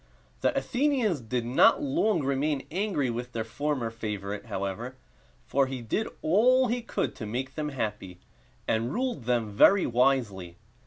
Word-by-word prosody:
The - - +1
Athenians 245 - +1
did 120 +1 -2
not 125 +3 +4
long 165 +5 +1
remain 140 +1 0
angry 180 - 0
with 120 +1 -5
their 115 - -2
former 130 0 -2
favorite, 105 -1 -5
however; 100 +5 -4 0.5
for 140 -1 +2
he 130 -2 -5
did 210 - -1 0.2
all 250 +9 +4
he 245 +1 -1
could 230 - -2
to 110 - -5
make 130 +4 -4
them 150 -1 -3
happy, 105 -9 -4 0.5
and 115 +3 0
ruled 245 - -2
them 120 -3 0
very 190 - +5
wisely. 115 -8 +1
130 Hz, 150 wpm, -28 LUFS, 115-160 Hz, 0.5 s, very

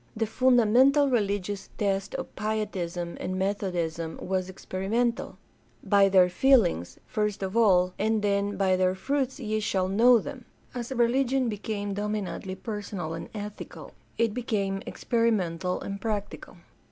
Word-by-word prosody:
The 225 - +1
fundamental 255 +4 +4
religious 205 -3 -1
test 195 -1 -1
of - - -6
Pietism 190 -5 -3
and 185 +1 -3
Methodism 175 -4 -2
was 185 0 -2
experimental 210 +6 -2 0.3
— - - -35
by 200 -1 +4
their 185 -2 +6
feelings, 180 - +3
first 210 -4 -2
of 190 +2 -4
all, 185 -5 +4
and 215 +1 +1
then 200 0 0
"by 190 -1 +3
their 185 0 +2
fruits 270 +6 -1
ye 215 -3 -1
shall 190 -3 0
know 235 +6 +6
them." 250 +2 -6 0.3
As 240 0 -5
religion 255 +1 +2
became 205 -1 -3
dominantly 205 -2 -3
personal 200 -7 -5
and 165 - -6
ethical 210 0 -7 0.3
it 230 -2 +1
became 200 -5 -1
experimental 190 -7 0
and 200 0 -5
practical. 210 -2 -4
205 Hz, 135 wpm, -27 LUFS, 190-230 Hz, 0.3 s, their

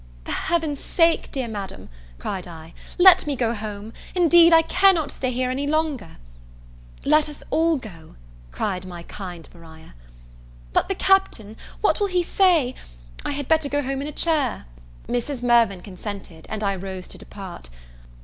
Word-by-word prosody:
"For - - -5
Heaven's 320 -4 -1
sake, 330 -1 +2
dear 265 -4 -3
Madam," 205 -3 -7 0.3
cried 185 - -5
I, 165 -1 -11 0.2
"let 365 -2 +7
me 290 - 0
go 235 -2 0
home; 210 0 -6 0.2
indeed 340 -1 +6
I 325 0 +7
cannot 345 -5 +3
stay 255 - -2
here 255 +1 -1
any 275 +2 -2
longer." 300 - -1 0.9
"Let 305 +1 +4
us 295 - -11
all 325 +1 +3
go," 180 - -10 0.4
cried 180 - -2
my 175 -2 -9
kind 175 -3 -8
Maria. 160 -2 -15 0.8
"But - - +1
the 390 - 0
Captain, 370 - +1 0.3
what 425 - +2
will 410 - +2
he 365 -2 +1
say 340 -9 +3 0.5
I - - -3
had 285 -2 -4
better 315 -3 +2
go 290 +1 0
home 270 +1 -2
in 285 - -4
a - - -5
chair." 295 - 0 0.4
Mrs. 245 +1 -2
Mirvan 235 -6 +3
consented, 190 -3 -8
and 215 -1 -4
I 200 -1 +1
rose 190 -1 -6
to - - -8
depart. 185 - -10
255 Hz, 160 wpm, -23 LUFS, 195-320 Hz, 0.9 s, let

